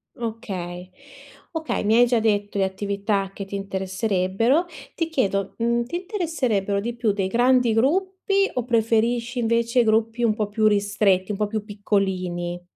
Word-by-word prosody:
Okay. 185 Hz, -6 st, -6 dB, 0.6 s
Okay, 320 Hz, -7 st, -2 dB
mi 215 Hz, +2 st, +3 dB
hai 245 Hz, -, +7 dB
già 240 Hz, -1 st, +2 dB
detto 205 Hz, -2 st, 0 dB
le 195 Hz, -, +2 dB
attività 200 Hz, 0 st, -2 dB
che 195 Hz, -, -6 dB
ti 200 Hz, -, -7 dB
interesserebbero. 195 Hz, -, 0 dB, 0.3 s
Ti 330 Hz, -, -1 dB
chiedo, 200 Hz, -, -1 dB
mhmm, 235 Hz, +1 st, +1 dB
ti 250 Hz, -, -6 dB
interesserebbero 275 Hz, -, -1 dB
di 235 Hz, +3 st, -4 dB
più 230 Hz, -3 st, +1 dB
dei 195 Hz, -2 st, -1 dB
grandi 245 Hz, +1 st, +3 dB
gruppi, 380 Hz, -, +1 dB
o 250 Hz, -, -1 dB
preferisci 235 Hz, +1 st, +1 dB
invece 235 Hz, +1 st, +2 dB
gruppi 225 Hz, +2 st, +1 dB
un 220 Hz, -2 st, +3 dB
po' 215 Hz, -2 st, -1 dB
più 215 Hz, +1 st, +1 dB
ristretti, 200 Hz, -1 st, +2 dB
un 200 Hz, -, -3 dB
po' 210 Hz, -, 0 dB
più 215 Hz, 0 st, -3 dB
piccolini? 185 Hz, -4 st, -2 dB
220 Hz, 155 wpm, -23 LUFS, 200-240 Hz, 0.6 s, hai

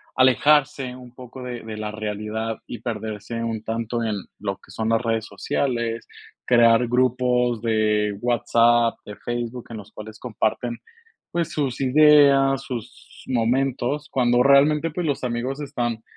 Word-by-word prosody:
a -, -, +2 dB
alejarse 135 Hz, 0 st, +3 dB
un 125 Hz, -1 st, -13 dB
poco 125 Hz, 0 st, -10 dB
de 125 Hz, -1 st, -6 dB
de 110 Hz, -1 st, -7 dB
la 105 Hz, 0 st, -4 dB
realidad, 110 Hz, +1 st, -4 dB
y 120 Hz, -, -7 dB
perderse 110 Hz, -1 st, -5 dB
un 110 Hz, -2 st, -3 dB
tanto 115 Hz, +1 st, -3 dB
en 110 Hz, -2 st, -1 dB, 0.2 s
lo 100 Hz, -1 st, -3 dB
que -, -, -19 dB
son 110 Hz, +2 st, -2 dB
las 115 Hz, 0 st, +2 dB
redes 115 Hz, -2 st, -1 dB
sociales. 115 Hz, +2 st, -2 dB, 0.4 s
Crear 120 Hz, 0 st, +5 dB
grupos 125 Hz, -1 st, +1 dB
de 105 Hz, -2 st, +1 dB
WhatsApp, 120 Hz, 0 st, +3 dB
de 105 Hz, -, -8 dB
Facebook, 120 Hz, 0 st, -4 dB
en 115 Hz, -, -7 dB
los 105 Hz, 0 st, -11 dB
cuales 110 Hz, 0 st, -10 dB
comparten, 120 Hz, +1 st, -2 dB, 0.5 s
pues, 170 Hz, -1 st, -1 dB
sus 140 Hz, -5 st, -2 dB
ideas, 140 Hz, -1 st, +5 dB
sus 120 Hz, -3 st, -9 dB
momentos, 130 Hz, +4 st, 0 dB
cuando 120 Hz, -1 st, +2 dB
realmente, 145 Hz, +4 st, +4 dB
pues, 170 Hz, +2 st, -4 dB
los 140 Hz, -3 st, -2 dB
amigos 125 Hz, +4 st, -3 dB
están 120 Hz, -5 st, -3 dB
120 Hz, 150 wpm, -23 LUFS, 110-130 Hz, 0.5 s, Crear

